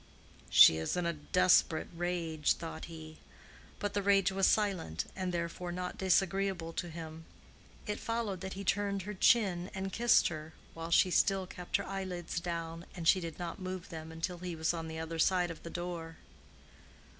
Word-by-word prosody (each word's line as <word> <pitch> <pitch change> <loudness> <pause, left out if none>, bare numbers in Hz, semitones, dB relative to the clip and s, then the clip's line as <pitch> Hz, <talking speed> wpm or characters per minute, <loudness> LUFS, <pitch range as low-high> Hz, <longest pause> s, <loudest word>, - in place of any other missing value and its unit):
"She 80 - +9
is 80 - -2
in 175 - 0
a 170 - 0
desperate 170 +1 +3
rage," 165 -3 0
thought 165 -1 -7
he. 160 -1 -10 0.6
But 205 - -3
the 205 - 0
rage 195 -1 +3
was 195 0 +3
silent, 190 - 0
and 185 -1 -2
therefore 175 +1 -3
not 180 +1 -5
disagreeable 190 -2 +1
to 175 - -3
him. 160 0 -8 0.6
It 210 -1 -3
followed 225 -5 -2
that 190 -1 -5
he 195 - -6
turned 200 0 0
her 210 +3 -5
chin 190 -3 +3
and 190 0 -4
kissed 240 0 +4
her, 155 -1 -8 0.2
while 165 0 -6
she 180 +2 +4
still 195 +1 +3
kept 180 -1 -2
her - - -5
eyelids 185 -4 -4
down, 170 -1 -5
and 170 -3 -4
she 190 - +6
did 165 -3 -6
not 175 0 -5
move 185 -1 -5
them 160 -1 -7
until 170 +2 -4
he 180 -1 -5
was 160 +1 0
on 165 -1 -4
the 160 0 -6
other 160 0 -4
side 180 0 +3
of 165 - -10
the 170 - -8
door. 170 -2 -5
175 Hz, 180 wpm, -32 LUFS, 165-190 Hz, 0.6 s, She